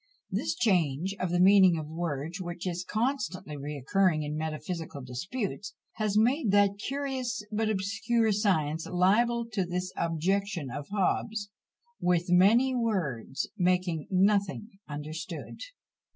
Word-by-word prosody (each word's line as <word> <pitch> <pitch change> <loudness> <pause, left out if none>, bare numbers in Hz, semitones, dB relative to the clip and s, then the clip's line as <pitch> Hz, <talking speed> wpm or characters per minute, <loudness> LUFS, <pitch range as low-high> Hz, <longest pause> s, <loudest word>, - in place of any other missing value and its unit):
This - - -1
change 180 - +1
of 185 - -1
the 175 +1 +1
meaning 190 -2 +6
of 155 - -4
words, 160 +1 -4
which 175 0 -6
is 180 -1 -2
constantly 220 - -2
recurring 150 +4 0
in 150 0 -3
metaphysical 160 -1 -4
disputes, 190 - -4 0.2
has 215 -2 0
made 245 +3 +3
that 200 0 +3
curious 260 -2 -3
but 215 +1 0
obscure 215 +3 +1
science 160 -7 +1
liable 230 +7 +2
to 200 -3 0
this 180 +1 -3
objection 170 - -1
of 145 +2 -6
Hobbes, 205 +1 -1 0.5
"with 175 0 +1
many 225 +9 +5
words 165 - -1
making 180 -3 +1
nothing 200 +2 +2 0.2
understood!" 150 +2 -6
185 Hz, 125 wpm, -29 LUFS, 160-210 Hz, 0.5 s, meaning